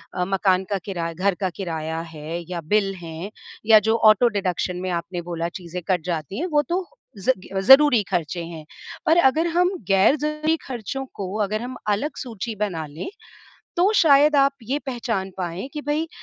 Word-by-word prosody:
अ, 180 - 0
मकान 190 -1 +2
का 200 - 0
किरा 170 -4 -3
घर 190 +3 0
का 190 - +1
किराया 160 -3 -3
है 155 +2 -5
या 175 -2 -3
बिल 195 -2 +2
हैं 165 +4 -7 0.3
या 220 -1 +8
जो 225 - +4 0.2
ऑटो-डिडक्शन 195 -5 0
में 185 - -3
आपने 175 +1 -3
बोला, 170 -1 -3
चीज़ें 180 0 -7
कट 185 -3 +1
जाती 170 - -3
हैं, 340 - -1
वो 300 -4 +3
तो 365 +2 0 0.3
ज़ 195 +5 -4 0.2
इ 190 0 -3
ज़रूरी 265 +1 +7
खर्चे 175 -2 -1
हैं। 165 -2 -9 0.4
पर 320 - +4
अगर 320 +1 +4
हम 350 +2 +2 0.2
ग़ैर-ज़रूरी 305 +10 +3
खर्चों 265 +1 -5
को 195 - -4 0.2
अगर 215 +2 -2
हम 250 +1 -6
अलग 210 +10 -1
सूची 230 -2 -5
बना 190 -6 -2
लें, 150 - -7 0.7
तो 370 +5 +4
शायद 295 -2 +6
आप 275 0 +4
ये 260 +6 -1
पहचान 230 -7 -2
पाएँ 180 +5 -4
कि 300 - -4
भई, 300 +3 -1
200 Hz, 175 wpm, -23 LUFS, 175-270 Hz, 0.7 s, या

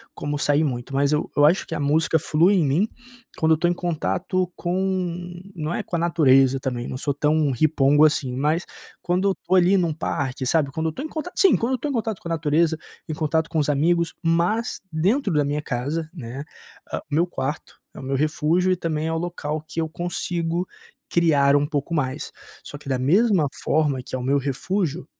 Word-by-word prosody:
como 145 0 -3
sair 145 +1 +2
muito, 130 -2 -3
mas 140 +1 +2
eu 150 0 0
eu 145 - +6
acho 165 +5 +3
que - - -4
a - - -3
música 155 +3 +2
flui 165 +6 +3
em 170 -6 +3
mim 160 +10 +2 0.5
quando 160 0 +2
eu - - +7
estou 175 +2 +1
em 175 - +2
contato 180 +1 -1
com 180 -1 -2 0.2
não 155 0 -3
é - - -2
com 175 - -4
a - - 0
natureza 135 -6 +4
também, 125 -3 -3
eu - - -6
não 130 - -4
sou 145 -1 -1
tão 150 0 +1
ripongo 145 +2 +3
assim, 145 -4 +2
mas 150 +6 0 0.3
quando 180 +3 0
eu - - +3
estou 180 0 -1
ali 185 +2 +5
num 170 -3 +1
parque, 135 -4 -3
sabe? 140 +1 +2
Quando 160 +3 -2
eu - - +2
estou 210 - -6
em - - -3
contato, 320 +3 -6
sim, 390 - +6
quando 235 +3 0
eu - - +3
estou 275 +4 -3
em - - -2
contato 220 -5 -2
com - - -9
a - - -4
natureza, 160 0 +1 0.3
em 160 - -3
contato 160 +1 0
com 160 - 0
os 150 - 0
amigos, 165 +4 +2
mas 175 +8 0
dentro 195 - +1
da 150 -1 +2
minha 145 +1 -1
casa, 150 +5 -3
né, 135 -3 -7 0.5
hã - - -2
meu 165 +5 +2
quarto 140 -1 -5
é - - -10
o - - -8
meu 135 +1 -2
refúgio 155 +5 +1
e - - +3
também 160 -2 -2
é 160 - -1
o - - 0
local 160 -3 -3
que 165 - -3
eu 160 - -2
consigo 175 0 -2 0.4
criar 145 -5 +3
um 145 - +1
pouco 150 +1 -3
mais. 140 -2 -2 0.3
Só 145 - -8
que 140 - -15
da 130 - +1
mesma 175 - +3 0.2
forma 145 -4 +1
que 125 - -6
é - - -1
o - - -5
meu 140 +2 +2
refúgio, 155 +5 -2
160 Hz, 220 wpm, -23 LUFS, 145-175 Hz, 0.5 s, eu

